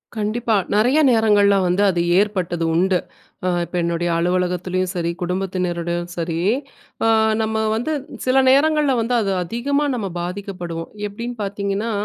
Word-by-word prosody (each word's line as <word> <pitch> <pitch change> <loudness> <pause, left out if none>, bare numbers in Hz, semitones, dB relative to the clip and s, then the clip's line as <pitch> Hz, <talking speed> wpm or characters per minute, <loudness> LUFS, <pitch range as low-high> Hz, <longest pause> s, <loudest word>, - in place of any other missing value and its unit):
கண்டிப்பா, 220 +2 -1 0.2
நெறைய 245 +8 +3
நேரங்கள்ல 210 -4 +4
வந்து 180 +2 +1
அது 175 -2 0 0.2
ஏற்பட்டது 185 -5 -1
உண்டு. 185 +1 +2 0.5
அ - - +3 0.2
இப்ப 180 - -9
என்னுடைய 170 0 -1
அலுவலகத்துலயும் 180 +1 0
சரி, 170 -2 -1
குடும்பத்தினர் 180 -1 -2
கூடயும் 175 0 -3
சரி, 165 -1 -2 0.7
அ - - +4 0.3
நம்ம 220 0 -1 0.2
வந்து 245 +8 -2 0.3
சில 255 +1 +4
நேரங்கள்ல 295 +1 +4
வந்து 230 +2 -1
அது 200 -2 -1
அதிகமா 275 - -1
நம்ம 215 -5 -3
பாதிக்கப்படுவோம். 175 -2 -5 0.2
எப்டின்னு 235 +4 -6
பாத்தீங்கன்னா, 200 +2 -2
195 Hz, 135 wpm, -20 LUFS, 175-225 Hz, 0.7 s, நேரங்கள்ல